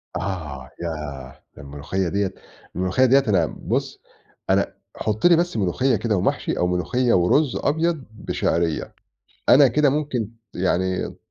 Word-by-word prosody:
آه، 80 Hz, -9 st, -5 dB
ياه، 75 Hz, -6 st, -6 dB
ده -, -, -11 dB
الملوخية 75 Hz, +7 st, -3 dB
دِيَّة 100 Hz, 0 st, -1 dB, 0.4 s
الملوخية 95 Hz, +8 st, +2 dB
دِيَّة 135 Hz, +2 st, +5 dB
أنا 100 Hz, -, +3 dB
بُص -, -, -3 dB, 0.5 s
أنا -, -, +2 dB, 0.2 s
حُط 110 Hz, +4 st, -2 dB
لي 175 Hz, -1 st, +7 dB
بس 175 Hz, -6 st, 0 dB
ملوخية 110 Hz, +6 st, +1 dB
كده 110 Hz, +1 st, 0 dB
ومحشي -, -, -1 dB
أو 90 Hz, -, +1 dB
ملوخية 115 Hz, +8 st, +1 dB
ورز 125 Hz, -, +3 dB
أبيض 160 Hz, 0 st, 0 dB
بشعرية، 85 Hz, -6 st, -1 dB, 0.6 s
أنا 140 Hz, +1 st, +8 dB
كده 150 Hz, +4 st, +3 dB
ممكن 130 Hz, -6 st, -2 dB, 0.2 s
يعني 95 Hz, 0 st, 0 dB
د -, -, -15 dB
100 Hz, 140 wpm, -22 LUFS, 90-130 Hz, 0.6 s, أنا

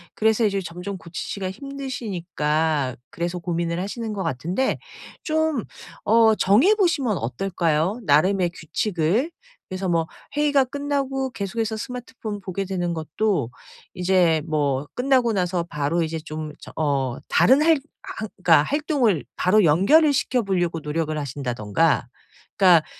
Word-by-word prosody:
그래서 220 Hz, +1 st, +2 dB
이제 200 Hz, -1 st, +1 dB
점점 180 Hz, +3 st, -6 dB
고치시기가 185 Hz, +3 st, -5 dB
힘드시니까 175 Hz, -, -2 dB, 0.2 s
그래서 175 Hz, +1 st, -3 dB
고민을 170 Hz, 0 st, -2 dB
하시는 220 Hz, +3 st, -4 dB
것 195 Hz, -, -3 dB
같은데 175 Hz, -, -1 dB, 0.4 s
좀 315 Hz, -5 st, 0 dB, 0.4 s
어 220 Hz, 0 st, +5 dB
정해 250 Hz, -, +4 dB
보시면 290 Hz, -, +1 dB
어떨까요 170 Hz, -, -1 dB
나름의 175 Hz, +5 st, +3 dB
규칙을? 185 Hz, -, -1 dB, 0.4 s
그래서 185 Hz, 0 st, -3 dB
뭐 165 Hz, -1 st, +2 dB, 0.3 s
회의가 290 Hz, -2 st, +4 dB
끝나고 270 Hz, -1 st, -2 dB
계속해서 220 Hz, +1 st, -3 dB
스마트폰 230 Hz, -3 st, -6 dB
보게 195 Hz, +1 st, -4 dB
되는 175 Hz, -2 st, -2 dB
것도 160 Hz, -, -1 dB, 0.5 s
이제 180 Hz, -3 st, +3 dB
뭐 145 Hz, -2 st, 0 dB
끝나고 250 Hz, -3 st, +2 dB
나서 180 Hz, -2 st, 0 dB
바로 160 Hz, +1 st, -1 dB
이제 160 Hz, 0 st, -3 dB
좀 155 Hz, -1 st, -6 dB
저 -, -, -11 dB
어 140 Hz, -5 st, 0 dB
다른 265 Hz, +4 st, +5 dB
할 325 Hz, -2 st, +5 dB, 0.4 s
활 220 Hz, -1 st, -4 dB
그러니까 160 Hz, -4 st, +6 dB
활동을 275 Hz, -, +1 dB
바로 205 Hz, +3 st, +3 dB
연결을 245 Hz, -, +5 dB
시켜 250 Hz, -3 st, +1 dB
보려고 175 Hz, -4 st, 0 dB
노력을 155 Hz, 0 st, -2 dB
하신다든가 130 Hz, 0 st, 0 dB, 0.5 s
그러니까 180 Hz, -5 st, +6 dB
185 Hz, 310 characters per minute, -23 LUFS, 160-235 Hz, 0.5 s, 그러니까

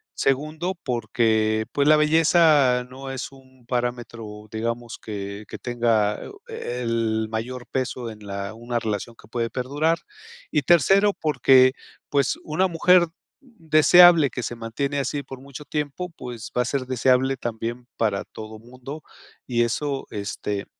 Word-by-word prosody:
segundo, 155 Hz, +7 st, 0 dB
porque, 110 Hz, -2 st, +1 dB
pues, 140 Hz, 0 st, +1 dB
la 155 Hz, 0 st, +7 dB
belleza 150 Hz, -4 st, +4 dB
no 135 Hz, +1 st, -8 dB
es 130 Hz, -, -5 dB
un 130 Hz, -2 st, -19 dB
parámetro, 120 Hz, -4 st, -4 dB
digamos 115 Hz, +1 st, -3 dB
que 100 Hz, 0 st, -6 dB
que -, -, -7 dB
tenga, 115 Hz, -4 st, +1 dB, 0.3 s
eh, 125 Hz, -, -5 dB
el 115 Hz, -1 st, 0 dB
mayor 120 Hz, +3 st, -5 dB
peso 130 Hz, -2 st, -2 dB
en 105 Hz, -1 st, -12 dB
la 100 Hz, +1 st, -4 dB
una 120 Hz, +1 st, -3 dB
relación 110 Hz, +1 st, -4 dB
que 110 Hz, -, -18 dB
puede 115 Hz, 0 st, -2 dB
perdurar 145 Hz, +6 st, 0 dB, 0.5 s
y 150 Hz, -, +1 dB
tercero, 195 Hz, +5 st, +4 dB
porque, 130 Hz, -5 st, +4 dB, 0.4 s
pues, 140 Hz, -2 st, +1 dB
una 160 Hz, +5 st, +1 dB
mujer 175 Hz, +1 st, +4 dB, 0.3 s
deseable 175 Hz, -, +6 dB
que 125 Hz, -, -4 dB
se 120 Hz, -, -4 dB
mantiene 135 Hz, +5 st, -3 dB
así 140 Hz, +2 st, -2 dB
por 135 Hz, -, -10 dB
mucho 140 Hz, +1 st, -10 dB
tiempo, 150 Hz, +5 st, -3 dB
pues, 120 Hz, -3 st, -7 dB
va 125 Hz, -, +4 dB
a -, -, -7 dB
ser 130 Hz, +1 st, -2 dB
deseable 130 Hz, +1 st, +2 dB
también 120 Hz, +1 st, -5 dB
para 105 Hz, -3 st, 0 dB
todo 110 Hz, 0 st, -10 dB
mundo, 130 Hz, +6 st, -10 dB, 0.4 s
y 120 Hz, -2 st, +1 dB
eso, 135 Hz, +3 st, -2 dB
este, 100 Hz, 0 st, -4 dB
125 Hz, 145 wpm, -24 LUFS, 115-145 Hz, 0.5 s, la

